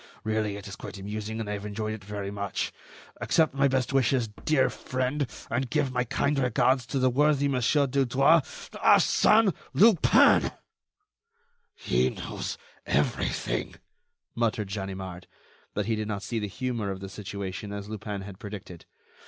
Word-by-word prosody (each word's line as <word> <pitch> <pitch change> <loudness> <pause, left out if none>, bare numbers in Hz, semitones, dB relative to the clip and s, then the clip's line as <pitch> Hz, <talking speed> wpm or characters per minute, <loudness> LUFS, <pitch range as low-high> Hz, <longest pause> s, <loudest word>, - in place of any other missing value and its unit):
Really, 110 -2 -1
it 100 - -9
is 100 - -7
quite - - -8
amusing, 105 +3 -5
and 110 - -4
I 105 - -2
have 100 -1 -5
enjoyed 110 +1 -3
it 110 -2 -8
very 100 0 -5
much. 100 -1 -3 0.4
"Accept 160 -4 +2
my 140 0 +3
best 130 -1 0
wishes, 130 -3 +2 0.2
dear 150 -4 +4
friend, 130 +2 -2 0.2
and 125 +2 -1
give 135 +2 +1
my 125 0 0
kind 140 +3 0
regards 125 0 +2
to 140 - -2
the 130 -1 +3
worthy 145 +1 +3
Mon. 130 -3 0
Dudouis. 135 +3 +3 0.3
"ARSÈNE 215 -3 +4 0.2
LUPIN." 210 -4 +5 1.2
"He - - +1
knows - - -5 0.3
everything," - - -1 0.6
muttered 115 -3 -1
Ganimard, 95 -3 -5 0.5
but 105 - 0
he 110 +1 0
did 110 -1 -3
not 100 -2 -3
see 115 - -2
the 105 - -2
humor 115 0 -3
of 95 -1 -4
the 95 - -6
situation 100 0 -6
as 100 0 -6
Lupin 105 -1 -5
had 95 -1 -10
predicted. 100 -4 -9
110 Hz, 155 wpm, -27 LUFS, 100-130 Hz, 1.2 s, LUPIN